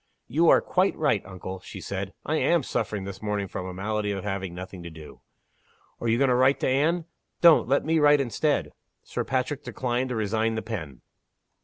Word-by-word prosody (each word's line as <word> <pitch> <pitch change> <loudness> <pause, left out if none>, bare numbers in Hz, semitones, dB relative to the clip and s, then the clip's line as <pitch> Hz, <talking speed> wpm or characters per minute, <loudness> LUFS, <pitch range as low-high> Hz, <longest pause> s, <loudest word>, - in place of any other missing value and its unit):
"You 165 +3 +3
are - - +6
quite 190 +1 +1
right, 115 -10 +1
uncle," 95 0 -7
she - - -10
said. 100 0 -4
"I 155 - 0
am 170 -1 +2
suffering 105 -4 -2
this 100 0 -7
morning 105 -2 -2
from 90 0 -5
the 90 - -6
malady 105 +2 -2
of 95 -2 -4
having 95 -3 -3
nothing 90 0 -8
to 85 - -7
do. 80 -2 -12 0.8
Are 115 - -3
you 115 +1 +3
going 135 +1 +3
to - - +4
write 130 +2 +4
to - - +1
Anne? 155 +6 +2 0.4
Don't. 170 -7 +7
Let 140 +3 +2
me 160 +1 +2
write 145 -1 +6
instead." 140 +3 0 0.3
Sir - - -3
Patrick 130 +2 -2
declined 125 0 -2
to 125 - -2
resign 110 +1 0
the 110 - -3
pen. 80 - -6
110 Hz, 200 wpm, -26 LUFS, 95-140 Hz, 0.8 s, Don't